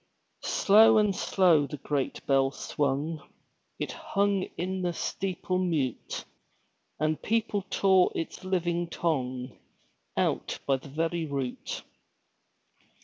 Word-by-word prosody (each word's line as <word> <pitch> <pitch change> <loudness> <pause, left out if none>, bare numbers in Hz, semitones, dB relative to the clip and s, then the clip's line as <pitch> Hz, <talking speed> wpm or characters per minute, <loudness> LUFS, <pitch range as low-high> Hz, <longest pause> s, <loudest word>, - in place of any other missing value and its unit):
Slow 220 +2 +6
and 210 -2 +3
slow 170 -8 +3
the 150 - -6
great 140 -1 -2
bell 135 -1 +3
swung, 145 +3 -2 0.6
It - - -3
hung 200 -1 0
in 185 +2 -2
the 175 -1 0
steeple 185 +1 -2
mute; 155 -9 -1 0.7
And 155 +1 0
people 220 -2 0
tore 190 -2 +4
its 165 +3 -4
living 175 -2 0
tongue 130 -6 -2 0.6
Out - - 0
by 135 -1 +2
the 135 +2 -12
very 165 +3 -1
root. 135 -3 -4
165 Hz, 110 wpm, -28 LUFS, 140-190 Hz, 0.7 s, Slow